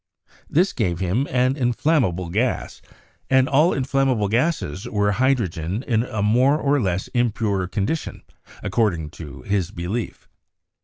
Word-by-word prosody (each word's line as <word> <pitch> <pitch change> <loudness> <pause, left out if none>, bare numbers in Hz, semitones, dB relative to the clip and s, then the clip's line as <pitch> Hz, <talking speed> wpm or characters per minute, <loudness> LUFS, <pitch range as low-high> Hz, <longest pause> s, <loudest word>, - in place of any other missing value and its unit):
This 180 +6 +2
gave 90 -7 -1
him 95 +10 0
an 130 +1 +2
in 120 -4 0
flammable 95 - +1
gas, 120 +7 -1 0.5
and 130 -1 +4
all 150 +6 +4
inflammable 130 -5 +1
gases 120 - -1
were 105 -2 +1
hydrogen 100 -5 0
in 115 -5 +1
a 110 -4 -3
more 125 +7 +4
or 145 -2 +1
less 95 -2 -1
impure 110 -6 0
condition, 105 - -3 0.4
acording 85 -10 0
to 70 -6 -10
his 100 -4 0
belief. 100 +6 -5
110 Hz, 135 wpm, -22 LUFS, 95-130 Hz, 0.5 s, and